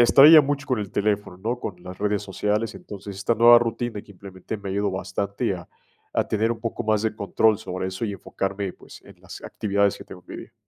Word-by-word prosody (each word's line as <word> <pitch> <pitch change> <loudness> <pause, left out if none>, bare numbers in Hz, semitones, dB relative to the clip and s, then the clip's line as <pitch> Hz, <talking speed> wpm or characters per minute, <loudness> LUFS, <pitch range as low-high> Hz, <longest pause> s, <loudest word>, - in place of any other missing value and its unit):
distraía 145 +6 +9
mucho 140 0 -2
con 125 -5 0
el 100 -1 -5
teléfono, 105 -2 -1
¿no?, 115 +6 -3
con 95 - -5
las 90 0 -9
redes 105 0 0
sociales. 105 +3 -1
Entonces, 100 -1 -9
esta 115 +4 0
nueva 120 +1 +8
rutina 115 -2 -3
que 105 - -18
implementé 95 +2 -8
me 100 -1 -6
ayudó 100 +1 0
bastante 95 +3 -2
a 85 -2 -10 0.5
a - - +2
tener 110 +1 0
un 115 -1 -3
poco 115 0 -3
más 110 -2 +1
de 110 -1 -1
control 105 +1 +2
sobre 95 0 -4
eso 95 +5 -3
y 100 - -3
enfocarme, 100 0 -4
pues, - - -15
en - - -17
las - - -11
actividades 100 -1 0
que - - -10
tengo 90 - -12
en - - -10
mi - - -6
día. 115 - -25
105 Hz, 225 wpm, -24 LUFS, 95-115 Hz, 0.5 s, distraía